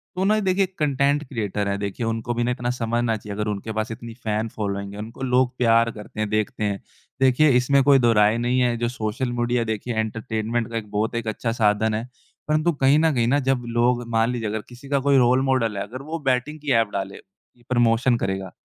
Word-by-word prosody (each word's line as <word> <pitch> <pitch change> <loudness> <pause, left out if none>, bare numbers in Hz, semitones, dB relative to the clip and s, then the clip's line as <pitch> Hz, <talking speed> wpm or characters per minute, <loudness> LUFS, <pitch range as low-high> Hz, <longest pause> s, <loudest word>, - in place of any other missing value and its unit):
तो 185 - -1
ना 215 +2 +3
देखिए 190 -1 +2
कंटेंट 140 0 +1
क्रिएटर 105 -5 -2
है, 100 0 -1
देखिए 100 +4 -3
उनको 115 +1 -2
भी 120 0 -1
ना 120 - 0
इतना 125 -1 -2
समझना 120 -1 0
चाहिए 105 -1 -8
अगर 105 +1 -2
उनके 105 +2 -5
पास 110 +2 -2
इतनी 115 0 -7
फैन 110 +1 -1
फॉलोइंग 100 -1 -3
है, 100 - -8
उनको 115 +4 -8
लोग 125 0 +2
प्यार 115 -1 +3
करते 105 -1 -10
हैं, 110 -1 -1
देखते 110 0 -1
हैं। 100 -1 -1 0.4
देखिए, 135 +3 +5
इसमें 135 +2 +4
कोई 140 0 +6
दोराहे 115 -2 +4
नहीं 120 +2 +1
है 120 -1 +2
जो 120 - -1
सोशल 120 +1 -3
मीडिया 120 0 +1
देखिए 110 +2 -3
एंटरटेनमेंट 110 +1 -2
का 115 - -2
एक 105 -2 -6
बहुत 110 +3 -1
एक 115 -1 -3
अच्छा 115 +2 -2
साधन 110 -1 +2
है, 110 +3 -3 0.4
परंतु 155 +3 +2
कहीं 140 0 +3
न 160 -1 +3
कहीं 120 -3 +1
ना 140 +3 +3
जब 130 -2 +1
लोग 120 +1 +1
मान 115 +1 +2
लीजिए 120 -3 -3
अगर 110 0 -3
किसी 125 +3 -13
का 140 -1 +2
कोई 140 0 +3
रोल 125 +1 +4
मॉडल 115 -6 +1
है, - - -1
अगर 125 +6 -8
वो 160 +4 -5
बैटिंग 135 +4 0
की 145 -1 -3
एप 110 - -2
डाले, 100 0 -4 0.5
प्रमोशन 120 0 +3
करेगा, 95 -3 -3
120 Hz, 220 wpm, -23 LUFS, 110-130 Hz, 0.5 s, कोई